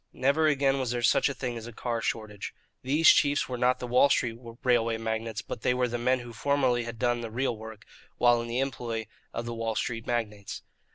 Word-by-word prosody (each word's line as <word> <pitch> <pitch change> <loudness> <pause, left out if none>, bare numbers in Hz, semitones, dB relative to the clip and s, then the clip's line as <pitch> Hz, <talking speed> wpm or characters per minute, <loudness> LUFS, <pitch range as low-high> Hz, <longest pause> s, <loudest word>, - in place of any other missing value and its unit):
Never 140 +4 +2
again 140 -2 +2
was 130 -2 -1
there 120 0 -2
such 115 - +4
a - - -2
thing 120 -3 -3
as 115 0 -7
a - - -7
car 115 0 -3
shortage. 110 -3 -4 0.3
These 150 +5 +3
chiefs 145 -1 +4
were 125 - -4
not 125 +1 +2
the 125 - -5
Wall 125 +3 +4
Street 125 -4 +1 0.3
railway 115 -3 +2
magnates, 110 -1 -3
but - - -6
they 125 - +2
were 125 0 +1
the 120 0 -3
men 130 +1 +2
who 120 -1 -9
formerly 130 -2 +1
had 115 -1 -6
done 120 0 +1
the 115 - -5
real 120 +2 -1
work 110 -1 -10 0.3
while 120 -1 +4
in 120 - -6
the 120 +1 -2
employ 120 -4 -3 0.3
of 115 - -4
the 120 - -4
Wall 115 -1 -2
Street 115 -1 -3
magnates. 105 -4 -3
120 Hz, 225 wpm, -28 LUFS, 115-130 Hz, 0.3 s, such